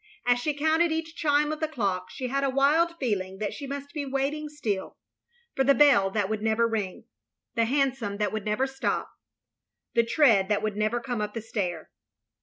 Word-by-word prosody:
As 245 0 +3
she 295 +4 -1
counted 315 +3 +2
each 320 0 -3
chime 295 0 +2
of 310 - -4
the 315 - 0
clock, 195 -11 -2
she 255 - -5
had 275 +2 0
a 275 - +2
wild 300 +6 +3
feeling 190 -7 -2
that 210 0 -3
she 280 - -7
must 280 +1 -6
be 300 -3 -3
waiting 280 +3 -2
still 220 -10 -3 0.3
— 475 0 -39
^for 270 - +2
the 275 +1 +5
bell 260 -10 +5
that 205 0 0
would 215 0 -2
never 225 +1 +2
ring 210 -5 -3 0.3
— - - -62
the 230 -1 +2
hansom 260 -5 0
that 210 -2 0
would 215 -2 -3
never 215 +6 0
stop 265 0 -2 0.4
— - - -61
the 235 - +5
tread 230 -5 +4
that 210 0 +1
would 215 -2 -1
never 215 +3 0
come 240 -2 -3
up 210 +1 -4
the - - -1
stair. 195 -7 -4
245 Hz, 210 wpm, -27 LUFS, 210-290 Hz, 0.4 s, the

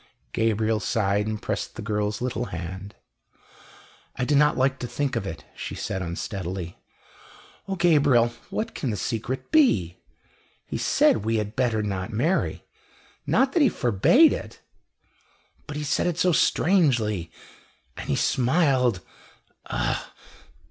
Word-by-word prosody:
Gabriel 110 -1 +1
sighed 105 -2 0
and 110 -1 -4
pressed - - -3
the - - -6
girl's 105 +2 -2
little 125 -1 -2
hand. 95 +3 -7 1.2
"I 125 - -1
do 145 - 0
not 150 +1 +4
like 130 +1 +1
to 125 - -4
think 140 +1 -2
of 95 - -2
it," 80 - -7
she - - -6
said 95 - -3
unsteadily. 90 0 -5 0.9
"O 195 - -2
Gabriel, 145 -9 +4 0.2
what 220 - -3
can 135 - -3
the 105 - -2
secret 120 +7 -4
be? 105 - +3 0.7
He - - -4
said - - +3
we 110 +2 -1
had 105 0 -2
better 115 -5 +1
not 100 0 -3
marry 150 - 0 0.6
not 265 +1 +2
that 340 - +3
he 280 - +6
forbade 125 - +4
it - - -7 1.1
but 150 -1 -5
he 150 - -3
said 150 - 0
it 175 -2 -1
so 180 0 +3
strangely, 125 - +2 0.7
and - - -8
he - - +2
smiled 130 - +2 0.7
ugh!" - - -1
115 Hz, 140 wpm, -25 LUFS, 100-145 Hz, 1.2 s, he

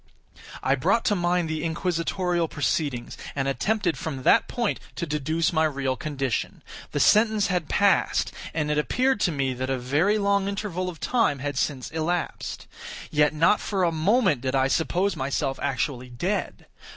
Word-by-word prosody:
I 135 - +3
brought 175 - +1
to 205 - +3
mind 175 -1 +1
the 160 0 -3
inquisitorial 170 +1 -1
proceedings, 140 -3 -2 0.2
and 135 -1 -1
attempted 190 +5 0
from 135 -5 -5
that - - +5
point 235 -3 -1 0.2
to 170 - -3
deduce 155 +3 0
my 160 0 +3
real 135 -3 -1
condition. 135 -3 -3 0.3
The 145 - -1
sentence 215 +3 +4
had 175 -4 -1
passed; 200 -1 +2 0.2
and 150 -2 -1
it 150 - +2
appeared 255 - +1
to 180 - +2
me 135 -3 -1
that 130 +1 -4
a 135 - 0
very 145 +12 +1
long 200 -1 +1
interval 200 -3 -3
of 165 -4 -9
time 230 - +1
had 145 +1 -4
since 130 -1 -2
elapsed. 165 +2 -3 0.5
Yet 150 -1 +3
not 165 +7 +4
for 195 -3 -1
a 170 - +3
moment 170 - +2
did 130 +1 -1
I 135 0 +2
suppose 175 +5 +1
myself 135 -1 -2
actually 130 -2 -2
dead. 175 - -3
160 Hz, 165 wpm, -25 LUFS, 140-190 Hz, 0.5 s, that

